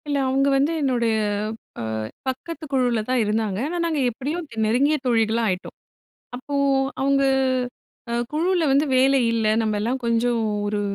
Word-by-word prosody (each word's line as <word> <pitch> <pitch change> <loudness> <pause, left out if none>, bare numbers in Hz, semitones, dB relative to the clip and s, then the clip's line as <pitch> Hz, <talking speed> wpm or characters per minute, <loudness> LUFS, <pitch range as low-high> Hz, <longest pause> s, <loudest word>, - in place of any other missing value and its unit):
இல்ல. 290 -1 0
அவுங்க 270 +1 +2
வந்து 280 +4 +2
என்னுடைய, 240 -5 +1 0.7
அ - - -3 0.4
பக்கத்து 310 +5 -4
குழுல 245 -4 +2
தான் 255 -2 +2
இருந்தாங்க. 210 -2 -1
ஆனா, 350 +3 -3
நாங்க 320 -3 0
எப்டியோ 275 +7 -4
த் - - -10
நெருங்கிய 265 +8 +3
தோழிகளா 230 -1 +2
ஆயிட்டோம். 185 0 -4 0.6
அப்போ 270 +3 -7 0.5
அவுங்க 275 0 +2 0.9
அ - - -1 0.2
குழுவுல 345 +2 +1
வந்து 280 +3 +3
வேலை 270 +1 +4
இல்ல 225 -1 0 0.2
நம்பெல்லாம் 220 +4 -1
கொஞ்சம் 235 0 +1 0.3
ஒரு 205 0 -1
255 Hz, 145 wpm, -23 LUFS, 225-280 Hz, 0.9 s, வேலை